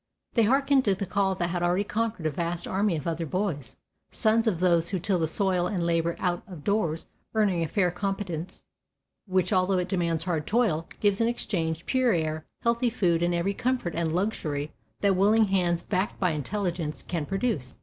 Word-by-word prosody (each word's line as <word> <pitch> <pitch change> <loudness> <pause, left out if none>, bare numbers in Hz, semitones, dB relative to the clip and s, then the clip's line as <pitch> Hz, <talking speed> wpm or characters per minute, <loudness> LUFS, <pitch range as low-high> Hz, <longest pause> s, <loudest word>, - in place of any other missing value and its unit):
They 230 -3 +4
hearkened 275 +3 +3
to 200 -2 +3
the 200 - -3
call 195 0 +1
that 175 -1 -1
had 175 -1 -1
already 175 +3 +2
conquered 220 -4 -2
a 155 - +2
vast 170 +3 -2
army 195 -1 +1
of 150 - -6
other 165 -1 -2
boys, 160 - -3 0.3
sons 225 +1 +2
of 185 -7 +1
those 170 -2 +3
who 195 - -1
till 180 +1 0
the 160 - +1
soil 180 +1 +1
and 180 -5 -1
labor 170 0 +1
out 175 -2 -1
of 175 -7 -10
doors 175 -6 0 0.3
earning 200 -6 +2
a 165 - 0
fair 180 0 +1
competence, 185 -3 -4 0.6
which 185 -1 +1
although 185 +1 +3
it 180 0 0
demands 170 -4 0
hard 165 -4 -2
toil, 205 -9 +1
gives 205 0 +2
in 230 - +3
exchange 165 -8 -2
pure 255 -3 +2
air, 155 -2 -2 0.2
healthy 235 +1 +2
food 175 -6 +1
and 175 0 +1
every 175 +4 0
comfort 245 -6 -1
and 165 -1 -1
luxury 155 -6 -2 0.3
that 200 -2 +3
willing 215 +4 +4
hands 175 -3 +1
backed 190 0 -1
by 180 -3 +2
intelligence 165 0 -3
can 165 -5 -3
produce. 195 - -2
180 Hz, 190 wpm, -27 LUFS, 165-205 Hz, 0.6 s, They